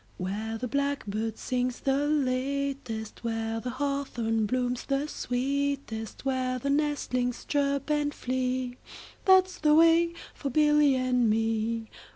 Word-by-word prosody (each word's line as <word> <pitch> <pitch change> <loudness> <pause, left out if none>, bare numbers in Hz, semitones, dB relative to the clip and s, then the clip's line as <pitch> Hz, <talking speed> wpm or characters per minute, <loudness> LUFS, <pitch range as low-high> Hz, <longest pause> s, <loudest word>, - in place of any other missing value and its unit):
Where 210 +5 -3
the 250 +2 -3
blackbird 225 -6 -2
sings 250 0 -2
the 275 +2 +1
latest, 275 -4 -1
5 - - -26
Where 225 -1 -2
the 250 - -4
hawthorn 245 -5 -1
blooms 250 +1 -1
the 275 +1 0
sweetest, 270 -4 -2
Where 255 -1 0
the 280 +3 -1
nestlings 280 -4 0
chirp 280 0 0
and 295 -1 +1
flee, 255 -1 -2 0.5
That 375 -1 +7
's 370 - -11
the 300 -1 +4
way 335 +1 +5 0.2
for 280 - -4
Billy 295 0 +4
and 250 -2 +2
me. 225 +1 0
255 Hz, 135 wpm, -28 LUFS, 230-280 Hz, 0.5 s, That